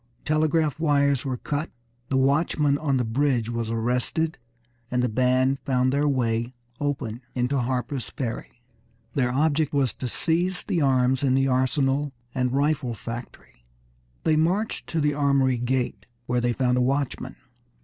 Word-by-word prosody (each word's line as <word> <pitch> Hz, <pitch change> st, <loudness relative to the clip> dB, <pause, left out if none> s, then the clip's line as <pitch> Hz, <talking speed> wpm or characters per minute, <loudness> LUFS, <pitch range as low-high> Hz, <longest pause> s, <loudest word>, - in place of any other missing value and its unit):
Telegraph 155 Hz, -1 st, +1 dB
wires 140 Hz, -4 st, +2 dB
were 130 Hz, -2 st, -2 dB
cut, 145 Hz, +5 st, -3 dB, 0.4 s
the 135 Hz, -, +1 dB
watchman 140 Hz, +1 st, +2 dB
on 140 Hz, -4 st, +1 dB
the 125 Hz, -, +1 dB
bridge 120 Hz, -1 st, +1 dB
was 115 Hz, -1 st, -2 dB
arrested, 125 Hz, +8 st, -1 dB, 0.5 s
and 125 Hz, 0 st, 0 dB
the -, -, +3 dB
band 130 Hz, +3 st, +2 dB
found 130 Hz, 0 st, +1 dB
their 145 Hz, +1 st, +2 dB
way 120 Hz, -2 st, 0 dB, 0.2 s
open 130 Hz, -5 st, -2 dB
into 125 Hz, +2 st, +1 dB
Harper's 125 Hz, 0 st, -2 dB
Ferry. 115 Hz, +4 st, -6 dB, 0.5 s
Their 125 Hz, -3 st, +1 dB
object 150 Hz, +2 st, +1 dB
was 135 Hz, -5 st, +2 dB
to 130 Hz, -, -5 dB
seize 175 Hz, +8 st, 0 dB
the 180 Hz, -5 st, 0 dB
arms 130 Hz, -1 st, +3 dB
in 135 Hz, -2 st, +2 dB
the 135 Hz, 0 st, +3 dB
arsenal 135 Hz, +2 st, +1 dB, 0.2 s
and 125 Hz, -1 st, 0 dB
rifle 140 Hz, -3 st, 0 dB
factory. 115 Hz, -, -9 dB, 0.6 s
They 155 Hz, -, +3 dB
marched 180 Hz, +8 st, 0 dB
to 165 Hz, -2 st, -1 dB
the 150 Hz, 0 st, +2 dB
armory 140 Hz, -3 st, +2 dB
gate, 125 Hz, +1 st, -1 dB, 0.2 s
where 125 Hz, 0 st, 0 dB
they 120 Hz, 0 st, +1 dB
found 125 Hz, 0 st, +1 dB
a -, -, +2 dB
watchman. 135 Hz, +2 st, -1 dB
135 Hz, 150 wpm, -25 LUFS, 125-145 Hz, 0.6 s, the